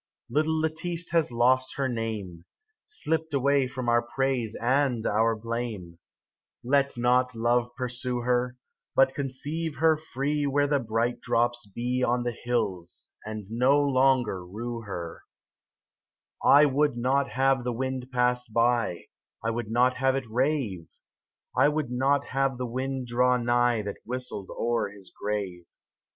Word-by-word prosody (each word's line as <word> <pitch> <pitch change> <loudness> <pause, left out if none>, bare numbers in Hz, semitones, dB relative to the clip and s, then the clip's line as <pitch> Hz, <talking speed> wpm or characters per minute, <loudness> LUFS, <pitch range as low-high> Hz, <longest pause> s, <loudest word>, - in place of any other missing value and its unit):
Little 155 +4 +1
Lettice 160 +2 -2
has 165 -6 +2
lost 130 +2 +2
her 135 -1 0
name, 110 -8 -4 0.4
Slipt 160 - -2
away 140 0 +3
from 130 -1 -5
our 120 0 +4
praise 120 -2 -1
and 125 -2 +1
our 110 +2 +2
blame; 110 -7 -5 0.6
Let 140 +1 +2
not 125 +1 +2
love 120 +1 +1
pursue 125 -1 -3
her, 125 0 0 0.4
But 135 0 +5
conceive 145 +4 -3
her 160 -1 +4
free 145 -1 -2
Where 145 +1 +2
the 145 0 +2
bright 115 0 -1
drops 120 0 0
be 125 +5 -2
On 120 0 +1
the 120 - -1
hills, 105 -8 -3
and 110 -2 -5
no 130 +5 +4
longer 130 -8 +2
rue 115 +6 -5
her 85 -6 -6 1.2
I 145 +1 +7
31 - - +6
1 - - -3
WOULD 145 -4 +2
not 135 +3 +1
have 135 -1 +2
the 125 - -1
wind 130 +1 -3
pass 125 0 +1
by 115 -4 +1 0.4
I 115 - 0
would 115 -2 -4
not 125 +3 +3
have 135 +1 +2
it 135 -1 -2
rave, 120 - -1 0.6
I 145 - +5
would 150 -4 -2
not 135 +3 +2
have 135 -1 0
the 125 - -3
wind 130 +2 -3
draw 125 +1 +3
nigh 120 -1 +2
That 100 0 -5
whistled 125 -5 -5
o'er 115 -3 -1
his 100 -2 -15
grave. 100 -4 -4
125 Hz, 150 wpm, -27 LUFS, 115-135 Hz, 1.2 s, I